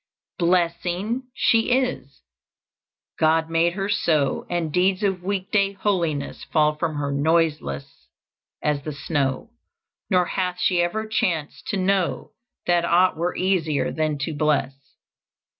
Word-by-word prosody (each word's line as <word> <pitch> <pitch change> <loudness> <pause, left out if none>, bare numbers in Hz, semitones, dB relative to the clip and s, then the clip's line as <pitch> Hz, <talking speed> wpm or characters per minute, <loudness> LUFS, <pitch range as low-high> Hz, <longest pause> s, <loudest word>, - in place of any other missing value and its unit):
"Blessing 180 +7 0
she 230 -2 +3
is; 245 - -1 1.0
God 160 +1 +2
made 165 +1 +2
her 195 +1 -2
so, 155 -8 +1
And 165 -3 -2
deeds 185 +2 +2
of 190 -3 0
week 190 +1 -3
day 200 -1 +2
holiness 175 -7 -1
Fall 150 -1 +2
from 155 0 -2
her 145 -1 -2
noiseless 150 - -1 0.6
as 150 -1 0
the 150 +1 -5
snow, 140 - -2 0.6
Nor 180 -3 +3
hath 180 0 -2
she 180 -1 +2
ever 215 +6 -1
chanced 170 -8 -2
to 205 - -1
know 190 -1 0 0.3
That 175 -1 +2
aught 175 +2 +3
were 170 +2 -2
easier 175 -6 +1
than 155 -2 -1
to 155 +3 -2
bless. 150 -2 +1
170 Hz, 130 wpm, -23 LUFS, 155-190 Hz, 1.0 s, she